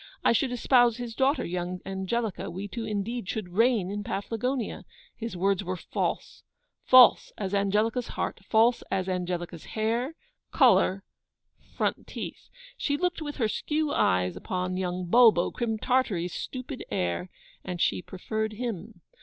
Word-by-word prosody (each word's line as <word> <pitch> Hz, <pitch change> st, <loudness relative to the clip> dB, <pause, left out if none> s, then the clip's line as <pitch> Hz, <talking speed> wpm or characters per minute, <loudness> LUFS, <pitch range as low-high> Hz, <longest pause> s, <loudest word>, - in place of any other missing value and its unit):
I -, -, +6 dB
should 245 Hz, +3 st, +1 dB
espouse 245 Hz, -1 st, +4 dB
his 240 Hz, -2 st, -5 dB
daughter, 270 Hz, +5 st, +1 dB
young 180 Hz, +1 st, -3 dB
Angelica; 195 Hz, +3 st, -2 dB
we 190 Hz, +4 st, -5 dB
two 225 Hz, +3 st, -5 dB
indeed 210 Hz, +1 st, -3 dB
should 210 Hz, -5 st, -3 dB
reign 220 Hz, -3 st, +3 dB
in 205 Hz, 0 st, -3 dB
Paflagonia. 230 Hz, +5 st, -3 dB, 0.3 s
His 230 Hz, -5 st, -5 dB
words 195 Hz, +1 st, +1 dB
were 185 Hz, 0 st, -3 dB
false -, -, -3 dB, 0.4 s
false 255 Hz, -1 st, +7 dB
as 195 Hz, -1 st, -3 dB
Angelica's 210 Hz, +5 st, +1 dB
heart! -, -, -3 dB
false 230 Hz, +4 st, +3 dB
as 190 Hz, -1 st, -1 dB
Angelica's 175 Hz, -2 st, -3 dB
hair, 235 Hz, +7 st, 0 dB, 0.4 s
colour, 190 Hz, +1 st, +4 dB, 0.7 s
front -, -, -1 dB
teeth! -, -, -7 dB, 0.3 s
She 285 Hz, -1 st, 0 dB
looked 355 Hz, 0 st, -1 dB
with 290 Hz, -1 st, -4 dB
her 230 Hz, -5 st, +1 dB
skew 300 Hz, +6 st, -1 dB
eyes 90 Hz, -1 st, +2 dB
upon 180 Hz, -, -3 dB
young 180 Hz, -1 st, -2 dB
Bulbo, 220 Hz, -2 st, +5 dB
Crim 225 Hz, -2 st, -2 dB
Tartary's 210 Hz, -8 st, 0 dB
stupid 255 Hz, +1 st, -6 dB
heir, 90 Hz, -, -2 dB, 0.3 s
and 180 Hz, -2 st, -5 dB
she -, -, +1 dB
preferred 220 Hz, +4 st, -3 dB
him. 215 Hz, -4 st, -5 dB
215 Hz, 145 wpm, -27 LUFS, 185-245 Hz, 0.7 s, false